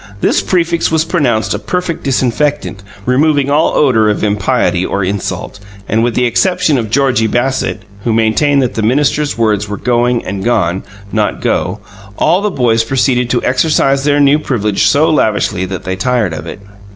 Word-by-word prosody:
This - - +1
prefix 170 -2 0
was 160 0 +1
pronounced 120 - 0
a 105 - -3
perfect 170 +9 -3
disinfectant, 130 -3 -1 0.2
removing 140 +2 +2
all 150 +3 +2
odour 115 -7 +3
of 105 - -1
impiety 100 -3 0
or 100 +1 -2
insult; 100 +1 -4 0.3
and, 110 +2 +1
with 120 -1 -1
the 125 - +2
exception 160 +2 +1
of 110 -2 -4
Georgie 125 -2 +1
Bassett 125 -2 -1 0.2
(who 115 - 0
maintained 115 +6 +2
that 125 - -2
the 110 - -2
minister's 145 +5 0
words 105 -3 0
were 105 - -4
"going" 120 +1 0
and 95 0 -4
"gone," 95 -6 0 0.3
not 105 -1 -1
"go"), - - -1 0.4
all 180 +3 +2
the 210 - 0
boys 115 - +1
proceeded 125 0 0
to 125 - 0
exercise 135 0 +1
their 145 0 +2
new 145 +1 +4
privilege 105 -9 0
so 150 +3 +3
lavishly 105 - 0
that 95 -1 -6
they 95 - -3
tired 110 -2 0
of 80 +1 -7
it. 95 - -7
120 Hz, 175 wpm, -13 LUFS, 105-145 Hz, 0.4 s, new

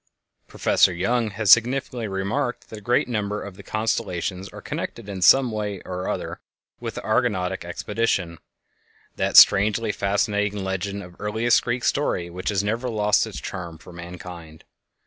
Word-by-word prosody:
Professor - - +3
Young 110 +6 0
has 105 0 +1
significantly 120 -1 +3
remarked 100 +5 -3
that 110 - -7
a - - -18
great 120 +4 +1
number 105 -3 -2
of 100 -2 -9
the 100 - -11
constellations 95 -3 -2
are - - -10
connected 115 -3 -6
in 95 -2 -6
some 130 +5 +6
way 105 -2 -3
or 90 0 -4
other - - -4 0.4
with - - -5
the - - -5
Argonautic 95 -5 0
Expedition—that 90 -1 -3
strangely 105 +2 +6
fascinating 100 0 0
legend 95 +1 -3
of 90 0 -13
earliest 110 +3 +2
Greek 120 0 -2
story 90 -11 0
which 90 +1 -4
has 100 -1 0
never 115 +5 -1
lost 105 -2 +2
its - - -7
charm 85 -3 -7
for 85 +2 -14
mankind. 85 -2 -10
100 Hz, 150 wpm, -23 LUFS, 90-110 Hz, 0.4 s, some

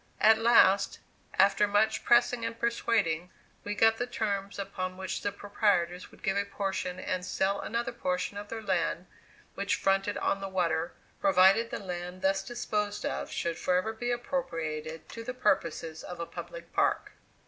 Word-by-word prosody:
At 220 +1 +6
last, 200 -4 +5 0.4
after 200 +2 +4
much 215 +2 +2
pressing 240 0 +4
and 230 0 -3
persuading, 205 -8 +1 0.3
we 205 0 -3
got 225 +1 +4
the 245 - -2
terms 200 -4 -2
upon 185 -2 -4
which 190 -1 -4
the 205 - -1
proprietors 200 -3 0
would - - -19
give 195 -1 +1
a 200 - +2
portion 195 -2 -3
and 185 -1 -2
sell 195 +2 0
another 235 +2 -2
portion 185 -4 -2
of 205 0 -7
their 225 -1 -5
land 180 -2 0 0.5
which 200 +1 0
fronted 195 +1 +1
on 195 - 0
the 195 - -4
water, 170 -3 0 0.3
provided 195 +4 +5
the - - -3
land 180 -1 -6
thus 195 0 +2
disposed 210 -3 -2
of - - -3
should 170 0 -2
forever 185 +5 +1
be 240 +2 -3
appropriated 165 - -3
to 230 - -7
the 250 +2 -5
purposes 165 -8 0
of 180 -1 -8
a 170 - -2
public - - -9
park. - - +1
195 Hz, 165 wpm, -30 LUFS, 180-220 Hz, 0.5 s, At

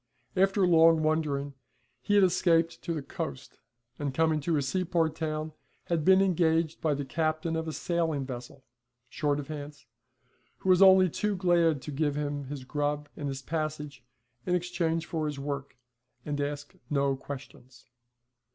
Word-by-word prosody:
After 195 +1 +3
long 165 -2 +5
wandering 150 -3 0 0.5
he 205 - +1
had 200 - +6
escaped 170 -2 +2
to 170 - -4
the 155 -4 -3
coast, 70 - -6 0.4
and 140 -3 -3
coming 160 0 +2
to 160 +2 0
a - - +1
seaport 165 +1 0
town 155 -1 -3 0.3
had 165 -3 -1
been 190 +3 +6
engaged 165 -3 +1
by 155 -3 +1
the 140 0 -4
captain 160 +2 -1
of 160 0 -2
a - - -2
sailing 160 -4 -1
vessel, 125 +1 -8 0.5
short 145 +1 0
of 145 - -6
hands, 145 -2 -8 0.7
who 190 - -3
was 185 0 +5
only 190 -1 +8
too 210 +4 -1
glad 170 -5 +2
to 150 - -6
give 145 0 0
him 145 -1 -3
his 135 -1 -6
grub 145 +2 -2
and 145 - -4
his 135 -1 -5
passage 150 -4 -4 0.4
in 180 - +2
exchange 170 -2 -1
for 155 -2 -2
his 145 -1 -4
work, 140 -1 -5 0.5
and 145 -1 -2
ask 145 +3 -4 0.2
no 140 -2 +1
questions. 130 -2 -10
155 Hz, 160 wpm, -29 LUFS, 145-170 Hz, 0.7 s, only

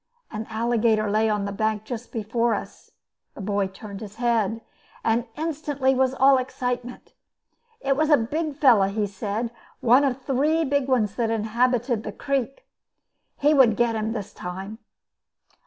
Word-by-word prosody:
An 215 0 -5
alligator 220 -2 +1
lay 220 +1 +2
on 210 -1 0
the 200 - -3
bank 215 +1 -1
just 240 +1 -7
before 230 +1 0
us. - - -8 0.5
The - - -8
boy 200 0 0
turned 200 +1 -9
his 210 -1 -9
head, 230 -2 0 0.4
and 230 +2 +1
instantly 290 -4 0
was 260 0 +1
all 265 0 +5
excitement. 250 -1 -4 0.7
It 275 - +1
was 310 +2 +1
a 295 - +7
big 300 +6 -2
fellow, 235 -10 +5
he 205 +1 -1
said, 205 +3 -3 0.3
one 250 +4 +5
of 270 -2 0
three 295 +5 +1
big 280 -1 0
ones 225 -7 +1
that 230 -2 +1
inhabited 235 +2 +1
the 215 - -6
creek. 270 +3 -3 0.7
He 295 +2 +3
would 255 -6 +5
get 235 -1 +2
him 220 0 -1
this 210 -4 -5
time. 190 +5 -7
235 Hz, 155 wpm, -24 LUFS, 215-265 Hz, 0.7 s, a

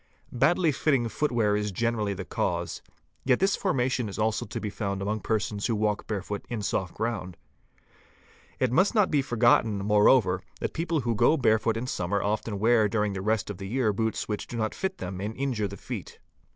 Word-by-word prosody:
Badly 155 +6 +3
fitting 135 -4 +1
footwear 115 -5 +1
is 105 0 -1
gene 115 +5 0
rally 105 -3 -1
the 95 0 -6
cause. - - -2 0.4
Yet 130 -2 +3
this 195 +1 +3
formation 130 - 0
is 100 - -7
also 110 0 0
to - - -5
be 105 - -4
found 100 -2 -3
among 105 +3 -2
persons 105 -1 -1
who 115 - 0
work 105 -1 -1
barefoot 100 -1 -4
in 115 -4 -3
soft 95 -2 -2
ground. 100 -7 -3 1.2
It 130 -2 +1
must 185 - +3
not 210 -3 +3
be 145 -3 +3
forgotten, 120 -4 +3
moreover, 105 -2 +4 0.2
that - - -3
people 165 -2 -1
who 120 -1 0
go 135 +8 +4
barefoot 110 -3 +2
in 115 - -3
summer 100 -4 -1
often 105 +1 -2
wear 110 0 +3
during 105 -2 0
the 95 - -4
rest 105 0 0
of 95 - -9
the 95 - -5
year 115 -1 +1
boots 110 +2 -1
which 105 -1 -3
do 120 - -6
not 110 -1 -1
fit 190 0 -3
them 90 0 -5
and 105 +2 -4
injure 130 -6 -1
the 100 +1 -9
feet. - - -7
110 Hz, 200 wpm, -27 LUFS, 100-125 Hz, 1.2 s, moreover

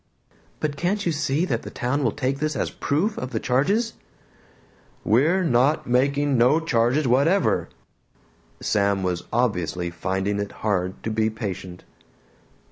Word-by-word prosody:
"But 145 -2 -2
can't 200 +5 -1
you 170 - +2
see 155 +1 0
that 120 -10 -1
the - - -8
town 135 +4 -1
will 115 - +2
take 135 +1 -2
this 155 0 -1
as - - -2
proof 190 +10 -1
of 125 - -4
the 115 -4 -2
charges?" 200 - +1 1.1
"We're 155 - +3
not 140 0 +2
making 140 +2 +2
no 125 +7 +5
charges 130 -1 +1
whatever!" 145 +11 +2 0.9
Sam 100 -1 +1
was 90 -2 -2
obviously 90 -7 0
finding 95 +4 -2
it 100 0 -4
hard 95 -3 -1
to 110 - -2
be 110 0 +1
patient. 95 -5 -6
125 Hz, 140 wpm, -24 LUFS, 105-150 Hz, 1.1 s, no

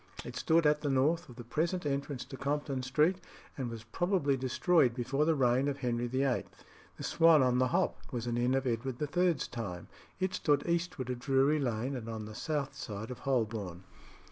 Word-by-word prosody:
It - - -7
stood 165 0 +3
at 150 0 +3
the 145 - -1
north 150 +6 +2
of 125 - -11
the 120 - -8
present 165 +8 -1
entrance 140 -2 -2
to - - -9
Compton 140 -1 -2
Street, 150 +8 +2 0.4
and 130 -3 -3
was 115 -1 -7
probably 155 - +1
destroyed 130 +1 +2
before 135 +4 0
the 160 0 +3
reign 130 0 +3
of 140 -1 -1
Henry 120 -2 -1
VIII. 130 +1 0 0.5
The - - -7
Swan 165 -4 +5
on 125 -1 +2
the 130 - +3
Hop - - 0
was 120 -2 -3
an 120 -1 -1
inn 125 +2 +2
of 135 0 0
Edward 120 +1 -2
III.'s 170 0 +1
time; 100 -8 -6 0.3
it 185 0 0
stood 145 -5 +1
eastward 170 -7 -1
of 125 - -4
Drury 135 +4 +3
Lane 125 0 -1
and 115 -3 -6
on 110 -1 -5
the 110 - -8
south 145 +3 -2
side 110 +2 -6
of 125 - -7
Holborn. 110 -9 -2
135 Hz, 195 wpm, -32 LUFS, 120-150 Hz, 0.5 s, Swan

